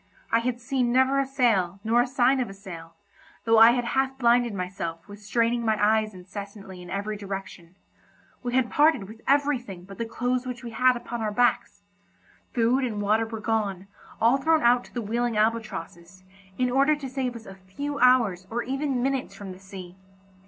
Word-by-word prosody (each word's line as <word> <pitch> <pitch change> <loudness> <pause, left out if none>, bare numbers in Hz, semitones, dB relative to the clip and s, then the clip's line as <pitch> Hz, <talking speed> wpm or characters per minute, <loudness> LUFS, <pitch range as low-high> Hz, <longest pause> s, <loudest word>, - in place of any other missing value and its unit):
I 230 - +4
had 240 +1 -2
seen 250 0 0
never 260 +2 +3
a 275 - 0
sail 220 -9 +1
nor 230 +2 +3
a 245 - 0
sign 260 +1 +2
of 245 - -1
a 195 - -10
sail, 170 -5 -10 0.5
though 225 -1 +5
I 225 +1 +10
had 245 -1 -1
half 265 +2 0
blinded 240 -1 +3
myself 180 -3 -5
with 205 0 -12
straining 235 +3 0
my 220 -1 +1
eyes 215 0 +2
incessantly 195 0 -9
in 175 - -11
every 205 +3 -3
direction; 195 -3 -8 0.7
we 245 0 -3
had 260 -2 +1
parted 290 -9 +3
with 220 +2 -12
everything 260 -10 0
but 195 +3 -12
the 230 - -1
clothes 250 +2 -2
which 250 -1 -6
we 235 - -6
had 255 +2 +3
upon 235 -1 -6
our 215 -1 -1
backs; 245 +3 0 0.7
food 245 +3 +2
and 220 -5 -2
water 215 +2 +1
were 225 -1 -6
gone, 210 -4 -1 0.3
all 235 +4 +4
thrown 315 +2 +2
out 240 +1 +4
to - - -18
the 240 - -2
wheeling 235 +1 -1
albatrosses, 195 -5 -3 0.3
in 250 -1 +1
order 275 +4 +3
to 285 -2 -7
save 260 -2 -3
us 230 -1 -10
a 195 - -9
few 190 +11 -6
hours 235 -8 +3
or 235 +1 -2
even 270 -1 -2
minutes 270 -1 -2
from 200 -2 -8
the 185 - -11
sea. 190 -2 -10
230 Hz, 195 wpm, -26 LUFS, 200-250 Hz, 0.7 s, I